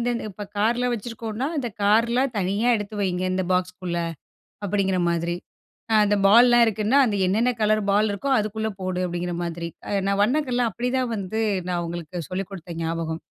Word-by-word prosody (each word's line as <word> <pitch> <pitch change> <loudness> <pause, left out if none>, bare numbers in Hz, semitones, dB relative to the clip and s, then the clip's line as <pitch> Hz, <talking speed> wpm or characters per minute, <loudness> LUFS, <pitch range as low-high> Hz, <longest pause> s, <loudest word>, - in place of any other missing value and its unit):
இந்த - - -4
இப்ப 205 +2 -7
கார்ல 235 +4 +2
வச்சுருக்கோம்னா, 230 +2 -4
"இந்த 250 -4 -2
கார்லாம் 235 +5 +3
தனியா 200 +5 +1
எடுத்து 205 +1 -6
வையுங்க. 185 -2 -1
இந்த 185 0 0
பாக்ஸ்க்குள்ள," 180 -1 -1 0.7
அப்டிங்கிற 190 -2 +1
மாதிரி. 170 0 -1 0.6
அ - - +3
அந்த 205 0 +2
பால்லலாம் 240 +3 +7
இருக்குன்னா 220 +4 +1
அந்த 210 -3 0
என்னன்ன 225 +6 +2
கலர் 215 0 +3
பால் 210 +2 +3
இருக்கோ 205 +8 -3
அதுக்குள்ள 220 +1 -2
போடு 185 -1 -2
அப்டிங்கிற 175 0 -3
மாதிரி. 170 0 -4 0.2
அ - - -3 0.2
நான் 200 0 +2
வண்ணங்கல்லாம் 250 -1 +1
அப்டிதான் 250 +1 -1
வந்து 210 +2 -3 0.3
நான் 175 -1 -1
அவங்களுக்கு 170 -1 -5
சொல்லிக் 185 +1 -3
குடுத்த 175 -3 -8
ஞாபகம். 165 0 -3
205 Hz, 160 wpm, -24 LUFS, 180-230 Hz, 0.7 s, பால்லலாம்